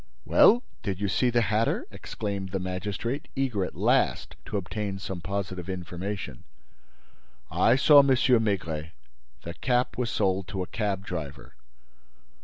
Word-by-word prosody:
"Well, 240 +4 +6 0.2
did 95 -3 -3
you 100 - 0
see 125 +6 +2
the 120 -1 +2
hatter?" 110 +2 +1
exclaimed 100 -2 -5
the 95 - -2
magistrate, 100 +8 -3
eager 125 -8 0
at - - -5
last - - +1
to 105 - -2
obtain 100 +1 -3
some 95 -2 -6
positive 95 0 -4
information. 90 -4 -5 1.1
"I 95 +8 +4
saw 145 +2 +7
M. 140 - +5
Maigret. 105 - +1 0.5
The 85 - -6
cap 125 +5 0
was 120 -2 0
sold 95 -3 0
to 95 +1 -3
a - - -12
cab 100 -3 -2
driver." 75 -8 -6
100 Hz, 140 wpm, -27 LUFS, 90-115 Hz, 1.1 s, saw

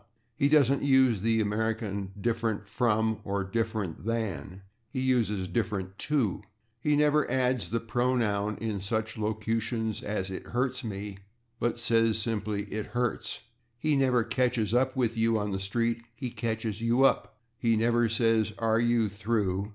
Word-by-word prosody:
He 140 +2 +2
doesn't 140 -3 +4
use 130 -6 +4
the 115 +1 +2
American 105 -2 -2
"different 115 -2 -1
/from/" 110 0 +1
or 100 0 -1
"different 110 -3 -2
/than/"; 100 -6 -3 0.3
he 130 - -4
uses 115 -7 +1
"different 95 -1 -2
/to/." 120 -11 0 0.4
He 150 +4 +2
never 150 0 +3
adds 125 -2 +1
the 115 - 0
pronoun 115 -4 0
in 110 -4 -3
such 110 +3 -2
locutions 110 +1 -2
as 100 -2 -3
"it 95 - -6
hurts 125 +1 -1
/me/," 100 -3 -6 0.4
but 120 0 0
says 115 -1 +2
simply 105 -2 -1
"it 110 0 -3
hurts." 120 -1 -2 0.4
He 150 +5 +1
never 130 -3 +3
"catches 120 -4 0
/up 130 +2 +2
with 120 -3 +1
you/" 115 0 +3
on 105 -1 -2
the 95 - -2
street; 115 +4 -1
he 125 -1 -5
"catches 115 -3 -2
/you 120 +3 +4
up/." - - +1 0.2
He 115 -2 +3
never 115 +1 +2
says 110 -1 +2
"are 115 -1 +2
you 120 -1 +3
through?" 100 -1 -1
115 Hz, 150 wpm, -29 LUFS, 105-120 Hz, 0.4 s, doesn't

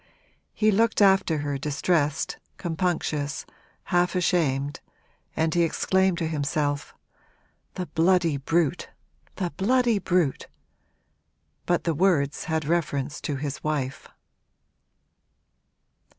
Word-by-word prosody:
He 215 0 +3
looked 225 +2 +2
after 195 -5 +4
her, 140 -1 -2
distressed, 150 +1 0 0.2
compunctious, 160 -4 -2 0.4
half 175 0 +1
ashamed, 145 -6 +1 0.6
and 160 0 +1
he 175 - +3
exclaimed 190 +2 +2
to 165 -2 -1
himself 145 -2 -2 0.8
'The 180 - -3
bloody 170 -2 +2
brute, 165 +4 0 0.5
the 180 -4 -2
bloody 235 +2 +2
brute!' 180 -6 0 1.2
But 175 -1 +1
the 165 - 0
words 150 -4 +1
had 160 -2 -1
reference 150 -3 -1
to 145 - -2
his 140 +1 -5
wife. 145 -4 -2
165 Hz, 100 wpm, -25 LUFS, 145-180 Hz, 1.2 s, after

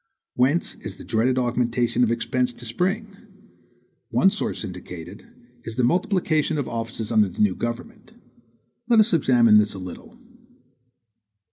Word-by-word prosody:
Whence 135 +7 +1
is - - -9
the - - -10
dreaded 125 +4 +1
augmentation 120 -1 +1
of 120 - +2
expense 125 +1 -1
to 120 - -11
spring? 195 - -2 0.9
One 190 - +4
source 210 - -2
indicated, 90 -3 -9 0.4
is 115 - -7
the 125 - 0
multiplication 160 - +1
of 140 - -2
offices 115 -1 -4
under 105 -3 +4
the - - -14
new 105 -3 +3
government. 215 - -6 0.8
Let 230 -2 +5
us 215 -1 +4
examine 120 -8 +5
this 105 -1 0
a - - -6
little. 95 - -9
125 Hz, 140 wpm, -23 LUFS, 115-170 Hz, 0.9 s, Let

